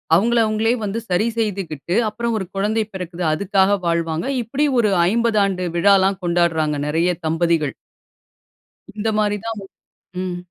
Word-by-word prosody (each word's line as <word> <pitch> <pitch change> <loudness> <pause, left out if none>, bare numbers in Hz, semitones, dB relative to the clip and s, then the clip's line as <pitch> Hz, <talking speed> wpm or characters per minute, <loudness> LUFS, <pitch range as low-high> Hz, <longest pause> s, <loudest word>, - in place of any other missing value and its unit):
அவங்கள 235 +6 +3
அவங்களே 220 +2 +1
வந்து 210 +3 -2
சரி 180 +5 +2
செய்துகிட்டு, 185 -7 -2
அப்புறம் 230 +1 -2
1 190 - -4
குழந்தை 215 +3 0
பிறக்குது 180 -1 -5
அதுக்காக 195 +3 +2
வாழ்வாங்க. 165 0 -1 0.2
இப்டி 270 +6 -1
ஒரு 215 - +3 0.2
50 230 -2 +2
ஆண்டு 185 -2 -2
விழாலாம் 195 +1 +3
கொண்டாடுறாங்க 165 -3 +1
நிறைய 165 +4 +1 0.2
தம்பதிகள். 165 -2 +1 1.2
இந்த 215 +1 -2
மாரி 205 -1 +1
தான் 225 -1 -3
வ, - - -10 0.6
ம். 180 -1 -3
195 Hz, 135 wpm, -20 LUFS, 170-215 Hz, 1.2 s, அவங்கள